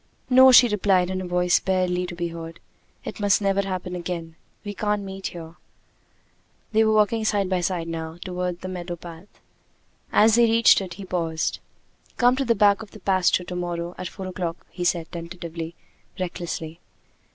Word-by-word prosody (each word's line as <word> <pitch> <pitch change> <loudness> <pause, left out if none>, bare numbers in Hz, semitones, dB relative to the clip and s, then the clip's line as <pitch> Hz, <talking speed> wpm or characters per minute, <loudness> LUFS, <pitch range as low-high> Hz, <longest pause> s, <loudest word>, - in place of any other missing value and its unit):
"No!" 260 +1 +8
she 250 -1 +8
replied, 190 -4 +2
in 185 0 -2
a 185 - -5
voice 180 0 +2
barely 180 -1 0
to 175 - -7
be 170 0 -3
heard. 165 0 -8 0.5
"It - - -6
must 205 -1 +3
never 200 -1 +1
happen 185 -2 -4
again. 170 -2 -5 0.3
We 205 - -4
can't 210 0 -1
meet 195 0 -5
here." 165 0 -9 1.1
They 220 0 +4
were 220 0 +3
walking 215 +1 +2
side 205 -3 +1
by 185 -1 +1
side 175 -1 -2
now 160 0 -5
toward 180 -1 -3
the 185 - -5
meadow 180 -1 -5
path. 170 +2 -11 0.8
As 220 +1 +5
they 235 +1 +6
reached 230 -2 +5
it 185 -3 -7
he 195 +1 -8
paused. 165 -3 -2 0.6
"Come 245 +1 +4
to 275 - 0
the 230 -1 +2
back 205 +1 +4
of 220 - -9
the 215 - -13
pasture 185 -1 +2
to 180 0 -7
morrow! 175 -1 -3
at 185 - -4
four 190 - -8
o'clock!" 180 -2 -5
he 180 - -5
said, 170 -2 0
tentatively, 170 -1 -7 0.4
recklessly. 170 -2 -5
180 Hz, 180 wpm, -24 LUFS, 170-200 Hz, 1.1 s, No